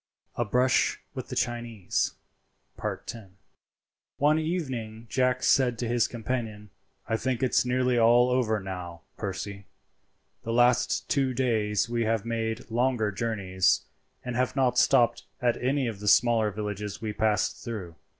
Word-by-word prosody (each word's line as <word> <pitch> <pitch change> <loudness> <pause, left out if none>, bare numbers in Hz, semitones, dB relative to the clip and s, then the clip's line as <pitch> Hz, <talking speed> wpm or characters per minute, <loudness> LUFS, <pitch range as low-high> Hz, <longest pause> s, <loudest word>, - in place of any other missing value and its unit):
A 120 - 0
BRUSH 125 +4 +2
WITH - - -6
THE - - -6
CHINESE.—X. 115 -1 -4 0.9
One 150 +2 +3
evening 130 -10 -3
Jack 130 -1 +1
said 125 -3 +3
to 120 - -2
his 120 0 +2
companion, 110 -3 -4 0.4
"I 115 - 0
think 130 +1 -2
it's 130 - +3
nearly 125 0 +2
all 120 +2 +5
over 115 -4 +1
now, 90 -3 -7
Percy. 100 0 -5 0.7
The 115 - -3
last 120 +1 +3
two 135 -4 +1
days 110 -5 +1
we 120 -1 -1
have 110 -1 0
made 115 -1 -3
longer 120 -3 +1
journeys, 100 -4 +1 0.4
and 125 -1 -3
have 125 +2 0
not 125 -3 +2
stopped 120 -1 +3
at 120 -1 0
any 135 +2 +1
of 110 -4 -4
the 105 - -6
smaller 115 0 +4
villages 105 0 -5
we 110 -2 -4
passed 110 0 0
through. 100 -8 -6
115 Hz, 140 wpm, -27 LUFS, 105-125 Hz, 0.9 s, all